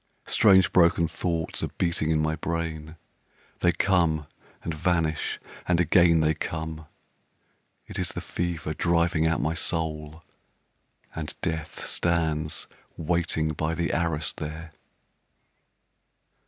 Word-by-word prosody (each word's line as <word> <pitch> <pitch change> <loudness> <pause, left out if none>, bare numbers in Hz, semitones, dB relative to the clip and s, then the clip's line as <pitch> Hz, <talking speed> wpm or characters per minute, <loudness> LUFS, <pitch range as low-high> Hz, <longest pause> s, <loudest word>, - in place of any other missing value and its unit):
Strange 95 -5 +5
broken 85 -1 +5
thoughts 85 0 -2
are - - 0
beating 85 -3 0
in 80 -1 +3
my 80 0 +1
brain, 80 -1 -3 0.6
They 85 - +4
come 85 -4 +2 0.4
and 85 - -2
vanish 80 -1 0 0.3
and 90 -1 +3
again 85 -1 +5
they 80 0 +3
come. 80 0 -5 1.0
It - - -7
is - - -1
the - - -5
fever 85 -3 -3
driving 85 -1 +2
out 80 - +1
my 80 +1 0
soul, 80 -1 -3 0.9
And 80 -2 -5
Death 80 -1 -3
stands 80 -2 0 0.3
waiting 80 -1 0
by 80 +1 -1
the 85 0 -1
arras 80 -4 0
there. 80 +2 -6
80 Hz, 115 wpm, -26 LUFS, 80-85 Hz, 1.0 s, Strange